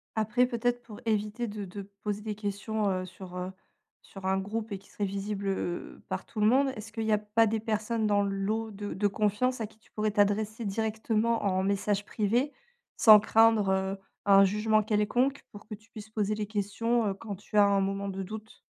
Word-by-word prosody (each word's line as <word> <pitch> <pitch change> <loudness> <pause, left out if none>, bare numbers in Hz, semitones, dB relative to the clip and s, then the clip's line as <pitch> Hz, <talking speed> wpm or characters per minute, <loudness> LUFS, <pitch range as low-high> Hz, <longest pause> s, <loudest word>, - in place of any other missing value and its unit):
Après, 220 +3 +2
peut-être 245 0 -1
pour 230 -3 -11
éviter 215 +2 -1
de 205 -1 -5
de 195 +2 -7 0.2
poser 210 0 -2
des 210 0 -4
questions, 205 +1 -2
heu, 185 -1 -1
sur, 185 0 -10
heu, 180 +1 -4 0.5
sur 195 -1 -11
un 190 0 +2
groupe 215 +3 -3
et 200 - -3
qui 195 - -22
seraient 205 - -2
visibles, 200 +1 -3
heu, 185 -2 -3
par 190 0 -3
tout 220 - -7
le 210 - +4
monde, 270 +4 +4
est-ce 220 0 -8
qu'il 225 0 -3
y 220 - +1
a 210 - +5
pas 210 +2 +2
des 220 +1 0
personnes 220 +1 -1
dans 205 -1 +3
le 200 0 -1
lot 215 +3 -1
de 205 0 -5
de 205 +1 +1
confiance 215 +5 0
à 220 - -2
qui 220 - -23
tu - - -28
pourrais 215 0 -1
t'adresser 210 +2 +1
directement 220 +2 0
en 190 -1 +1
message 200 +1 0
privé 235 +7 0 0.5
sans 215 -2 +9
craindre, 220 -1 +4
heu, 190 +1 0 0.3
un 195 -1 +7
jugement 210 +2 +2
quelconque 230 +6 +1
pour 205 +1 -12
que 215 - -6
tu 220 +2 -23
puisses 215 -1 -10
poser 215 -1 -1
les 210 -1 -3
questions, 220 +3 0
heu, 195 - 0
quand 200 +1 -7
tu 205 +3 -11
as 205 - +8
un 200 0 +3
moment 195 +1 -2
de 195 0 -4
doute? 215 +3 -8
210 Hz, 215 wpm, -29 LUFS, 200-220 Hz, 0.5 s, sans